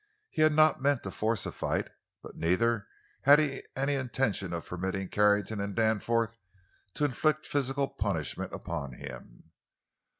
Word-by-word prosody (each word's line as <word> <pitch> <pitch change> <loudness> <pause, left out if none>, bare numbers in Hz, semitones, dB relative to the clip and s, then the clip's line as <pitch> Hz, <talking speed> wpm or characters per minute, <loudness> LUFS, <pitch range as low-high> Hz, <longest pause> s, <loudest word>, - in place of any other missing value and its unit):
He - - -1
had 155 0 +5
not 155 -2 +4
meant 140 -2 +2
to 95 - -5
force 110 +1 0
a - - -3
fight, - - -2 0.4
but - - -10
neither 105 +6 +1 0.3
had 145 +2 +8
he 145 -3 0
any 135 +2 0
intention 125 -8 -1
of 85 -1 -4
permitting 95 +1 -3
Carrington 105 0 +2
and 100 -1 -4
Danforth 115 +1 +1 0.6
to 150 - +2
inflict 155 +3 +1
physical 140 0 0
punishment 95 - -3
upon 70 -3 -5
him. - - -11
115 Hz, 145 wpm, -30 LUFS, 95-140 Hz, 0.6 s, had